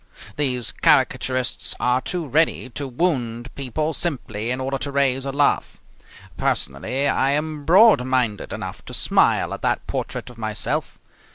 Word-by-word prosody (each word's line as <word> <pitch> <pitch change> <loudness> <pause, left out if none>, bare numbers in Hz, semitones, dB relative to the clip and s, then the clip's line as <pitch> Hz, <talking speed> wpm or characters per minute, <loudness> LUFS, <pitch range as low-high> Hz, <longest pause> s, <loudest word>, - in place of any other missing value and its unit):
These 125 -5 0
caricaturists 130 -1 +2
are 125 +1 +2
too 175 +2 -3
ready 150 -2 +1
to 140 +3 -4
wound 125 -4 -2
people 150 +4 -2
simply 120 -10 -2
in 125 +1 -1
order 135 +1 -2
to 140 - -3
raise 135 -1 +1
a 135 - -2
laugh. 145 +1 +1 0.6
Personally 125 - -1
I 135 -1 +2
am 150 0 -3
broad 190 - +6
minded 125 -5 -1
enough - - -6
to - - -4
smile - - +2
at - - -7
that - - 0
portrait - - -4
of 120 - -16
myself. 110 -1 -2
135 Hz, 150 wpm, -22 LUFS, 125-145 Hz, 0.6 s, broad